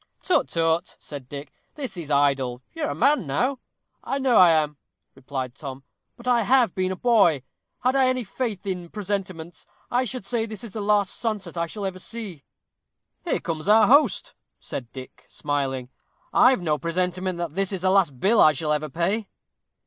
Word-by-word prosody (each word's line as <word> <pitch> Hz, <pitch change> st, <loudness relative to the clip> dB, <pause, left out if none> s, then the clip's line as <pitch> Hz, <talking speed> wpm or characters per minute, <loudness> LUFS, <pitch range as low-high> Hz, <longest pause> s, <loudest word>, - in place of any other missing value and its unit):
"Tut 365 Hz, -, +2 dB
tut," 165 Hz, 0 st, 0 dB
said 140 Hz, -4 st, -10 dB
Dick, 145 Hz, 0 st, -8 dB, 0.2 s
"this 275 Hz, -7 st, -5 dB
is 165 Hz, -5 st, -7 dB
idle 135 Hz, -3 st, +1 dB
you 325 Hz, -, -7 dB
are 300 Hz, -, 0 dB
a -, -, -3 dB
man 285 Hz, -, +2 dB
now." 250 Hz, -, 0 dB, 0.4 s
"I 275 Hz, -, -2 dB
know 265 Hz, -3 st, +2 dB
I 180 Hz, -2 st, +8 dB
am," 150 Hz, -2 st, +2 dB, 0.4 s
replied 130 Hz, -2 st, -5 dB
Tom, 135 Hz, -1 st, -8 dB, 0.3 s
"but 240 Hz, -, -11 dB
I 245 Hz, -2 st, +4 dB
have 240 Hz, -2 st, +3 dB
been 185 Hz, 0 st, -1 dB
a -, -, -2 dB
boy. 195 Hz, -, +3 dB, 0.4 s
Had 255 Hz, +2 st, +2 dB
I 265 Hz, -1 st, +4 dB
any 255 Hz, -1 st, 0 dB
faith 215 Hz, -2 st, -4 dB
in 180 Hz, -3 st, -4 dB
presentiments, 185 Hz, -5 st, -5 dB, 0.2 s
I 250 Hz, +1 st, +2 dB
should 255 Hz, -4 st, -5 dB
say 230 Hz, -1 st, -1 dB
this 215 Hz, -1 st, -7 dB
is 230 Hz, -, -8 dB
the 215 Hz, -, -4 dB
last 205 Hz, -1 st, +2 dB
sunset 210 Hz, -7 st, -3 dB
I 170 Hz, 0 st, -1 dB
shall 205 Hz, +3 st, -5 dB
ever 185 Hz, -1 st, -4 dB
see." 195 Hz, -8 st, -6 dB, 0.8 s
"Here -, -, +1 dB
comes 160 Hz, +1 st, -4 dB
our 215 Hz, +1 st, +7 dB
host," 285 Hz, +7 st, +3 dB, 0.3 s
said 120 Hz, -3 st, -6 dB
Dick, 130 Hz, -1 st, -11 dB
smiling. 135 Hz, -3 st, -2 dB, 0.4 s
"I've 250 Hz, -7 st, +5 dB
no 150 Hz, -3 st, 0 dB
presentiment 180 Hz, +2 st, -1 dB
that 170 Hz, -3 st, -4 dB
this 195 Hz, +2 st, 0 dB
is 190 Hz, -3 st, -3 dB
the 185 Hz, -, +3 dB
last 175 Hz, -10 st, +2 dB
bill 210 Hz, -, +4 dB
I 155 Hz, -, +7 dB
shall 150 Hz, -1 st, 0 dB
ever 150 Hz, 0 st, -2 dB
pay." 190 Hz, -, -1 dB
185 Hz, 185 wpm, -24 LUFS, 150-225 Hz, 0.8 s, I